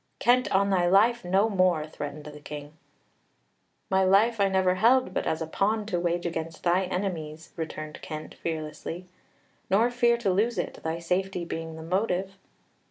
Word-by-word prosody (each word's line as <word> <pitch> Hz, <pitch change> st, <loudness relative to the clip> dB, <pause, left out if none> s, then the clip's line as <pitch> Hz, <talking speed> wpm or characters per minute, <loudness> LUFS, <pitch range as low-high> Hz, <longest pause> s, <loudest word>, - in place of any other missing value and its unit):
"Kent, 250 Hz, +1 st, +3 dB
on 200 Hz, +1 st, +3 dB
thy 180 Hz, -2 st, +3 dB
life, 220 Hz, +6 st, +4 dB
no 190 Hz, +4 st, +3 dB
more!" 185 Hz, -6 st, +2 dB
threatened 150 Hz, -1 st, -7 dB
the 150 Hz, 0 st, -9 dB
King. 150 Hz, 0 st, -8 dB, 1.2 s
"My 190 Hz, 0 st, +4 dB
life 205 Hz, +4 st, +4 dB
I 200 Hz, -, +5 dB
never 190 Hz, -1 st, +3 dB
held 240 Hz, +7 st, +3 dB
but -, -, -1 dB
as 160 Hz, +1 st, -1 dB
a -, -, -3 dB
pawn 210 Hz, +6 st, 0 dB
to 180 Hz, -5 st, -1 dB
wage 175 Hz, 0 st, -1 dB
against 165 Hz, -1 st, -4 dB
thy 180 Hz, +2 st, +2 dB
enemies," 170 Hz, -4 st, -4 dB
returned 155 Hz, -2 st, -6 dB
Kent 155 Hz, 0 st, -7 dB
fearlessly; 160 Hz, +2 st, -5 dB, 0.6 s
"nor 220 Hz, +6 st, +3 dB
fear 240 Hz, -1 st, +3 dB
to 205 Hz, -6 st, 0 dB
lose 225 Hz, +5 st, +1 dB
it, -, -, -3 dB
thy 160 Hz, +1 st, -2 dB
safety 180 Hz, +1 st, -1 dB
being 165 Hz, -1 st, -5 dB
the 160 Hz, -, -8 dB
motive." 190 Hz, +2 st, -1 dB
180 Hz, 165 wpm, -27 LUFS, 160-200 Hz, 1.2 s, I